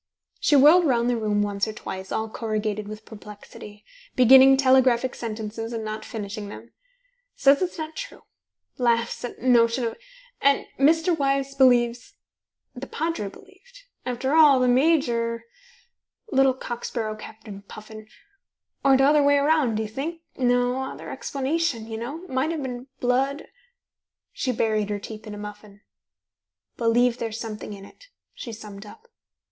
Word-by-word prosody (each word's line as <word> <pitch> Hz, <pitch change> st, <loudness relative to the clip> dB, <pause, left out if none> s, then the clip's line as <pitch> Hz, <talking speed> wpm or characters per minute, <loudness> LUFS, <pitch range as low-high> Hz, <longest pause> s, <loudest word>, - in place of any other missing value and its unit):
She 295 Hz, -, +3 dB
whirled 310 Hz, +5 st, +7 dB
round 240 Hz, -2 st, +2 dB
the -, -, +1 dB
room 210 Hz, -2 st, 0 dB
once 200 Hz, 0 st, -1 dB
or 215 Hz, -, -5 dB
twice, 190 Hz, -2 st, -7 dB
all 220 Hz, -, -1 dB
corrugated 215 Hz, -2 st, -3 dB
with 215 Hz, +1 st, -9 dB
perplexity, 210 Hz, -1 st, -12 dB, 0.3 s
beginning 265 Hz, +2 st, +7 dB
telegraphic 260 Hz, -2 st, +3 dB
sentences, 225 Hz, 0 st, -5 dB
and 225 Hz, -1 st, -4 dB
not 215 Hz, 0 st, -5 dB
finishing 205 Hz, -1 st, -6 dB
them: 230 Hz, +3 st, -11 dB, 0.6 s
"Says 280 Hz, +3 st, +4 dB
it's 365 Hz, -1 st, -2 dB
not 315 Hz, 0 st, -6 dB
true -, -, -8 dB, 0.6 s
laughs 235 Hz, -1 st, 0 dB
at 245 Hz, -, -7 dB
notion 240 Hz, -1 st, +3 dB
of 230 Hz, -, -4 dB, 0.4 s
And 280 Hz, 0 st, +3 dB
Mr. 325 Hz, +5 st, +3 dB
Wyse 275 Hz, -2 st, 0 dB
believes 245 Hz, -3 st, +2 dB, 0.6 s
The 260 Hz, +2 st, -8 dB
Padre 320 Hz, -10 st, -3 dB
believed. 485 Hz, -, -18 dB, 0.2 s
After 255 Hz, +2 st, -2 dB
all, 300 Hz, -4 st, +6 dB
the 255 Hz, -, +2 dB
Major 245 Hz, -4 st, +2 dB, 0.9 s
Little 270 Hz, -1 st, +3 dB
cock 240 Hz, -2 st, -6 dB
sparrow 215 Hz, -2 st, -3 dB
Captain 215 Hz, -2 st, -11 dB
Puffin 215 Hz, +1 st, -12 dB, 0.8 s
Or 270 Hz, -1 st, +5 dB
t'other 290 Hz, +3 st, +4 dB
way 285 Hz, 0 st, +4 dB
round, 285 Hz, -6 st, +2 dB
do 220 Hz, -, -1 dB
you 215 Hz, -, -6 dB
think? 315 Hz, +9 st, -5 dB
No 245 Hz, 0 st, +1 dB
other 265 Hz, -, -7 dB
explanation, 275 Hz, -3 st, -2 dB
you 220 Hz, 0 st, -6 dB
know 290 Hz, +10 st, -6 dB
Might 260 Hz, +1 st, -1 dB
have 320 Hz, -3 st, -3 dB
been 250 Hz, 0 st, -6 dB
blood 265 Hz, +4 st, 0 dB, 0.4 s
" -, -, -66 dB
She 255 Hz, -, -1 dB
buried 215 Hz, -3 st, 0 dB
her 205 Hz, -, -1 dB
teeth 215 Hz, +2 st, -9 dB
in 210 Hz, -, -7 dB
a -, -, -9 dB
muffin. 210 Hz, 0 st, -10 dB, 0.9 s
"Believe 240 Hz, +1 st, +2 dB
there's 225 Hz, -1 st, -4 dB
something 215 Hz, -2 st, -6 dB
in 195 Hz, -1 st, -10 dB
it," -, -, -18 dB, 0.3 s
she 235 Hz, -, -8 dB
summed 210 Hz, -2 st, -10 dB
up. 455 Hz, -, -15 dB
245 Hz, 150 wpm, -24 LUFS, 215-275 Hz, 0.9 s, whirled